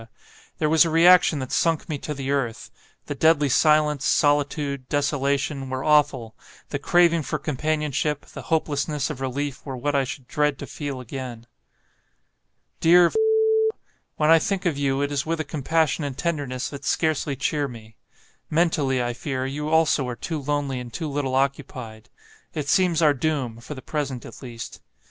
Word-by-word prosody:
There 155 - +1
was 160 0 +5
a 165 - 0
reaction 170 0 +6
that 130 -2 -5
sunk 165 -2 +1
me 150 -3 -3
to 150 - -5
the 135 0 -3
earth; 125 -5 -2 0.3
the - - -4
deadly 150 0 +3
silence, 150 0 +3
solitude, 145 -3 +1
desolation, 140 -1 0
were 130 0 -3
awful; 145 -7 +2 0.3
the - - -3
craving 170 -1 +3
for 155 +1 -3
companionship, 150 0 -1
the - - -10
hopelessness 150 -2 -1
of 135 -3 -8
relief, 140 +1 -3
were 135 -3 -6
what 145 +4 -1
I 140 -1 +2
should 130 -1 -7
dread 150 -3 0
to - - -7
feel 140 -4 -5
again. 125 -2 -7 1.3
"Dear, 175 +1 +6 1.0
when 155 +1 +3
I 165 - +7
think 195 +3 -2
of 170 -4 +1
you, 140 0 0
it 145 - -2
is 145 +1 -2
with 165 0 -1
a - - 0
compassion 160 +1 0
and 140 -2 -4
tenderness 145 -7 -2
that 140 -1 -8
scarcely 155 -2 0
cheer 145 +2 -1
me. 110 -3 -12 0.5
Mentally, 150 -6 +1
I 120 0 -2
fear, 130 +1 -3
you 150 +3 -3
also 160 -4 +3
are 125 - -4
too 155 +4 -4
lonely 140 -2 -2
and 120 -1 -8
too 160 +5 -4
little 140 -2 -2
occupied. 130 -5 -3 0.5
It 150 -2 -3
seems 170 -1 +3
our 150 -2 +5
doom, 130 -5 -2
for 135 +5 -8
the 130 - -10
present 140 -5 -3
at - - -11
least. 120 -3 -8
145 Hz, 170 wpm, -24 LUFS, 135-155 Hz, 1.3 s, I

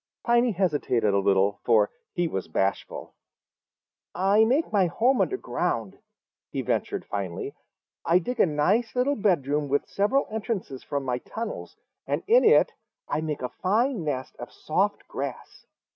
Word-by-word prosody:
Piney 240 0 +3
hesitated 145 - +1
a 100 - +3
little, 100 +1 +2
for 110 -3 +3 0.2
he 175 -1 0
was 95 - -4
bashful. 95 +4 -2 1.0
"I 195 +5 +4
make 265 +2 +1
my 195 -3 +4
home 245 +9 +2
under 390 - 0
ground," - - -2 0.5
he - - -3
ventured - - -2
finally. 420 -1 -4 0.5
"I 170 - +4
dig 235 +7 -3
a - - +5
nice 195 +11 +1
little 260 +3 +2
bedroom 150 - +1
with 145 +1 0
several 230 +8 +1
entrances 210 - -4
from 140 -1 -3
my 125 -1 -1
tunnels, 225 - -6 0.3
and - - -1
in 480 +3 +5
it - - +5 0.4
I - - -1
make 155 -4 -3
a 125 - -2
fine 220 +2 +1
nest 135 -4 -3
of - - -8
soft - - -1
grass. - - -7
180 Hz, 150 wpm, -26 LUFS, -, 1.0 s, a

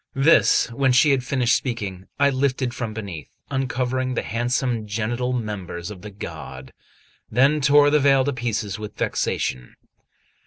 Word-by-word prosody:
This, 135 +5 +4
when 130 +2 +2
she 135 +4 +5
had 135 -2 +1
finished 125 -1 +2
speaking, 100 -7 -4
I 140 0 +4
lifted 130 -2 0
from 115 -3 -4
beneath, 100 -8 -7 0.2
uncovering 130 -1 -1
the - - -1
handsome 120 -1 -1
genital 120 +4 -2
members 105 -6 -4
of 95 -3 -10
the 105 - -8
god; 65 -9 -9 0.6
then 140 +6 +3
tore 145 +1 +5
the 150 - +4
veil 135 -2 +4
to 145 - 0
pieces 110 -5 -3
with 105 0 -8
vexation. 60 -1 -2
125 Hz, 150 wpm, -23 LUFS, 105-135 Hz, 0.6 s, she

